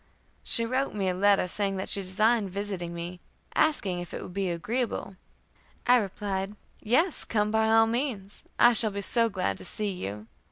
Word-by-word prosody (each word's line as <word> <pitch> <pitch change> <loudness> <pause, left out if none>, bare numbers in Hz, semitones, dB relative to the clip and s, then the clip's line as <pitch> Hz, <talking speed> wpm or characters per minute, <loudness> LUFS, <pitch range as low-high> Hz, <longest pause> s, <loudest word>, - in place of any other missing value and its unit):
She 230 - +1
wrote 260 +1 -1
me 195 -2 0
a - - 0
letter, 195 0 +3
saying 195 +1 -1
that 190 - -4
she 200 - +3
designed 210 +3 +1
visiting 190 -3 -4
me, 175 +1 -6 0.3
asking 200 - +1
if 175 - -7
it - - -5
would 180 - -9
be 195 -1 -1
agreeable. 210 +4 -2 0.7
I 250 0 +6
replied, 200 -1 -3 0.3
"Yes, 300 - +1
come 210 -2 0
by 220 0 +2
all 225 0 +6
means. 225 -4 -3
I 240 0 +6
shall 220 -1 +4
be 200 0 -4
so 230 +3 +4
glad 185 - -2
to - - -10
see 210 -1 -3
you." 105 - -6
205 Hz, 185 wpm, -27 LUFS, 185-225 Hz, 0.7 s, I